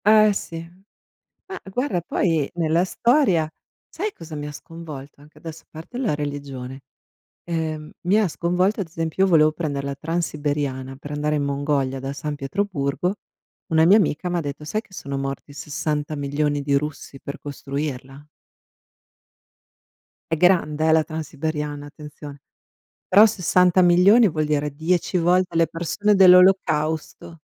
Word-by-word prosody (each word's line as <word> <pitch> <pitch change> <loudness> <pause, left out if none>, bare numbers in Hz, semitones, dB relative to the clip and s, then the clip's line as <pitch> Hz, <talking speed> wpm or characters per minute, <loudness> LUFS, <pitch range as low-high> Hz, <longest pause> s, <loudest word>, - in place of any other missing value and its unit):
Eh 215 0 +6
sì. 165 -3 -6 0.8
Ma 380 -1 -7
guarda 225 -7 -1
poi 165 -4 0
nella 165 +1 +2
storia 195 - +2 0.4
sai 415 +4 -4
cosa 165 - -10
mi 145 0 -5
ha 150 - -6
sconvolto 145 -3 -10
anche 150 +1 -18
adesso 165 -1 -9
a - - -55
parte 160 +10 -10
la 245 - 0
religione, 140 -3 -6 0.7
ehm, 160 -2 -3
mi 195 +5 +3
ha 215 - +2
sconvolto 180 +5 0
ad 185 - -4
esempio 165 +3 -1
io 195 - +3
volevo 155 -3 +5
prendere 145 -4 -3
la 140 0 -3
transiberiana 145 -4 -3
per 145 +1 -9
andare 150 +1 -1
in 145 - 0
Mongolia 140 -2 -1
da 135 +1 -4
San 145 +1 -4
Pietroburgo. 150 +2 -2 0.5
Una 160 -2 +3
mia 190 +5 +7
amica 180 -3 0
m'ha 175 -1 -1
detto: 145 0 -6
"Sai 215 +8 -2
che 220 - -29
sono 140 -6 -5
morti 135 +1 -5
60 150 +1 -3
milioni 145 +1 -1
di 140 0 +1
russi 140 -1 -4
per 140 - -7
costruirla?" 140 -1 -5 2.1
È - - +1
grande 160 -3 +3
eh, 160 - +5
la 160 0 +4
transiberiana 150 -2 -4
attenzione, 145 -1 -11 0.7
però 200 +3 +8
60 180 -3 +3
milioni 185 +6 +6
vuol 155 -2 -1
dire 150 -1 0
10 170 +4 0
volte 180 0 +2
le 165 0 +4
persone 205 +6 0
dell'olocausto. 180 -4 +3
155 Hz, 145 wpm, -22 LUFS, 145-180 Hz, 2.1 s, però